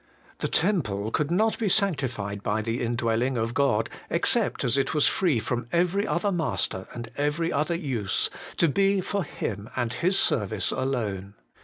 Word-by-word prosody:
The - - 0
temple 110 - 0
could 150 +3 0
not 215 +6 +2
be 220 -3 +1
sanctified 130 - 0
by 110 +2 -1
the 115 +2 -2
indwelling 120 +1 0
of 115 +1 -1
God, 115 -5 +2 0.2
except - - +1
as 125 0 +2
it 140 +3 +1
was 150 - +4
free 175 -9 +2
from 120 +2 -2
every 180 +4 +2
other 205 - +1
master 155 - -1
and 120 -1 -7
every 150 +4 0
other 155 +4 +1
use, 125 - 0 0.3
to 170 - +5
be 195 +5 +3
for 200 +1 -1
Him 105 -7 -5
and 120 -2 -1
His 180 +7 +1
service 100 0 +1
alone. 105 -7 -2
130 Hz, 165 wpm, -26 LUFS, 110-170 Hz, 0.3 s, to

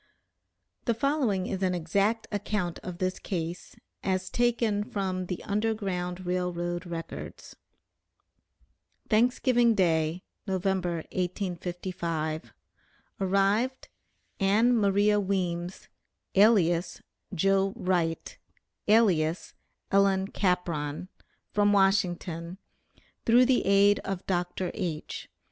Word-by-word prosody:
The 235 - +1
following 245 -8 +1
is 190 -1 -3
an 185 -1 +1
exact 200 +7 0
account 205 -4 -2
of 180 -2 -7
this 185 0 -2
case, 170 -1 -5 0.3
as 185 -1 -1
taken 235 -4 +1
from 190 -5 -3
the 180 - -5
Underground 195 -4 -2
Rail 180 0 0
Road 175 +1 -4
records: 165 -1 -7 1.6
"THANKSGIVING 240 +1 +3
DAY, 165 -2 +1 0.2
Nov., 190 -1 -2
1855. 175 -2 -2 0.7
Arrived, 200 +7 +1 0.5
Ann 215 +5 +4
Maria 205 -1 +3
Weems, 180 -2 -2 0.5
alias 190 -5 +3 0.3
'Joe 195 +2 +2
Wright,' 175 -3 -1 0.5
alias 185 -7 +3 0.4
'Ellen 195 -1 +3
Capron,' 180 -5 -1 0.4
from 205 0 +3
Washington, 180 -3 +1 0.7
through 240 +2 +6
the 255 0 +3
aid 200 +1 +5
of 195 -1 -5
Dr. 180 0 -2
H. 170 -7 -5
190 Hz, 90 wpm, -28 LUFS, 175-205 Hz, 1.6 s, through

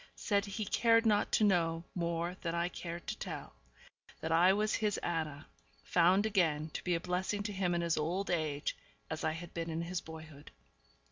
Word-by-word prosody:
said 200 -2 +1
he 205 +2 -3
cared 230 +3 +4
not 210 -2 +3
to - - +3
know 165 -4 +2
more 170 0 -1
than 170 -1 -2
I 170 +1 +1
cared 170 -1 -6
to - - -4
tell; - - -6 0.7
that 160 - -3
I 175 +3 +6
was 210 +2 +1
his 210 -2 +1
Anna, 155 -3 -2 0.4
found 185 +4 +4
again, 160 -7 +1
to - - -5
be 180 -1 +1
a - - 0
blessing 185 +4 -1
to 205 0 -3
him 185 -3 0
in 170 - +1
his 170 -2 +1
old 180 +6 -1
age, 155 -4 -1 0.4
as 160 - -3
I 155 - +1
had 170 +1 -8
been 165 0 -3
in 165 +1 -2
his 175 +1 -3
boyhood. 160 -2 -10
170 Hz, 195 wpm, -33 LUFS, 165-195 Hz, 0.7 s, I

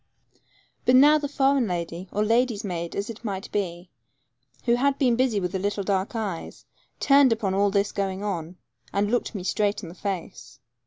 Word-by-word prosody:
But 250 - +4
now 295 +4 +7
the 290 - -3
foreign 275 -3 +2
lady, 175 0 -4
or 210 +1 0
lady's 230 -1 +1
maid, 170 -4 -4
as 200 - -2
it 230 - -12
might 195 -3 -4
be, 175 -3 -3 0.7
who 235 - +2
had 275 +3 +2
been 250 -5 +3
busy 245 -4 +1
with 180 0 -3
little 200 +1 -1
dark 195 +3 -1
eyes, 200 -7 -5 0.3
turned 280 -2 +5
upon 215 -4 0
all 200 +1 +3
this 200 0 +1
going 195 -1 -2
on, 180 -4 -4 0.3
and 205 +1 0
looked 245 -1 -1
me 190 - -4
straight 205 +2 0
in 170 - -7
the - - -10
face. 185 -8 -6
205 Hz, 180 wpm, -25 LUFS, 190-240 Hz, 0.7 s, now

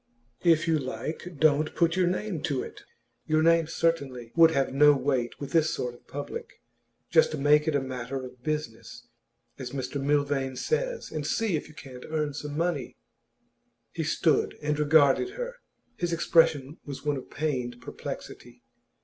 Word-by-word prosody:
If 170 -1 +4
you 160 -2 +3
like, 145 +7 -5
don't 155 0 +3
put 165 0 +2
your 185 -1 +2
name 185 -2 -2
to 135 -3 -1
it; - - -10 0.5
your 155 0 +3
name 165 -1 +4
certainly 140 -8 -1
would 165 -1 +8
have 135 -4 0
no 145 +2 +7
weight 130 -3 -1
with 140 - -6
this 160 -2 +3
sort 125 -1 -3
of 120 - -19
public. 145 +1 -7 0.5
Just 160 -1 +4
make 150 +2 +4
it 155 - +1
a - - +4
matter 130 0 -5
of 125 -1 -12
business, 120 -5 -5 0.5
as 130 -2 -5
Mr 135 +1 -3
Milvain 140 -2 0
says, 480 +1 -2
and 155 -2 -3
see 215 +4 0
if 150 - -4
you 155 - -16
can't 130 -5 -10
earn 150 -2 -1
some 145 0 -5
money.' 165 -7 -2 0.9
He - - -3
stood - - +1
and 150 0 -1
regarded 150 - +4
her. - - -5 0.4
His 175 -1 -1
expression 160 -3 +2
was 140 0 -8
one 145 -1 +1
of 130 - -8
pained 125 -5 -2
perplexity. 120 0 -8
150 Hz, 165 wpm, -27 LUFS, 135-165 Hz, 0.9 s, would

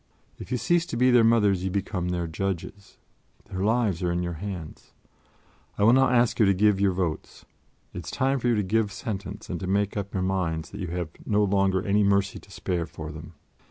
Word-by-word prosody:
If - - -9
you 125 - +1
cease 175 +6 +1
to 165 - -4
be 125 +1 +4
their 120 -2 +6
mothers 105 -5 +3
you 95 - -1
become 95 -2 -2
their 90 -1 -1
judges; 95 +3 -5 0.5
their 95 - -4
lives 105 -3 +1
are 90 -1 0
in 85 +1 -1
your 85 0 -3
hands. 95 -6 -7 0.8
I - - +1
will 115 +3 +6
now 135 +1 +5
ask 120 -1 +2
you 110 - +5
to 100 - +3
give 105 0 +3
your 100 -1 +4
votes: 90 -4 -4 0.5
it 90 - -6
is - - -6
time 135 0 0
for 120 - -1
you 120 - +3
to 105 - +1
give 105 +2 +1
sentence 100 0 -6
and 90 - -4
to 95 - -5
make 100 +1 0
up 100 -1 -4
your 95 - 0
minds 90 -4 -1
that - - -7
you 90 - -3
have 85 -1 -3 0.2
no 105 -1 +3
longer 95 -1 +2
any 105 +1 +3
mercy 100 0 +1
to - - -19
spare 90 -3 -3
for 80 -1 -8
them. 80 +2 -10
100 Hz, 225 wpm, -26 LUFS, 90-105 Hz, 0.8 s, their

